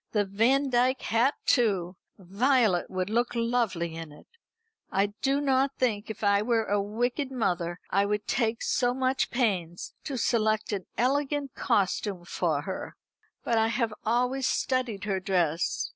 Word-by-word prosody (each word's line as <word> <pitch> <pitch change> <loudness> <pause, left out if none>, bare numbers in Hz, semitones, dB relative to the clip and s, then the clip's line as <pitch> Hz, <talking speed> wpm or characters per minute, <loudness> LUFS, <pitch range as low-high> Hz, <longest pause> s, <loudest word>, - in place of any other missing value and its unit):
The 210 -2 +2
Vandyke 250 +5 +2
hat 240 +6 +2
too! 195 -8 +2 0.2
Violet 205 0 +2
would 185 +1 -3
look 240 +2 0
lovely 230 -8 0
in 165 -2 -7
it. 150 - -15 0.7
I 200 +2 +1
do 275 +1 +2
not 275 -1 +1
think 225 -4 0
if 220 - -7
I 200 0 +4
were 225 0 +1
a 205 -1 +1
wicked 245 +7 -2
mother 180 -8 -1
I 200 +1 +2
should 210 0 -1
take 230 -2 0
so 245 0 +1
much 260 0 0
pains 185 -9 -1
to 275 - -3
select 220 -3 +1
an 195 -3 -4
elegant 280 +2 0
costume 200 -4 0
for 160 -5 -1
her. 190 - -6 0.5
But 230 -2 +1
I 220 - +3
have 230 -1 -1
always 250 +4 +1
studied 250 -6 -1
her 195 -2 -1
dress. 175 -4 0
220 Hz, 150 wpm, -28 LUFS, 195-250 Hz, 0.7 s, I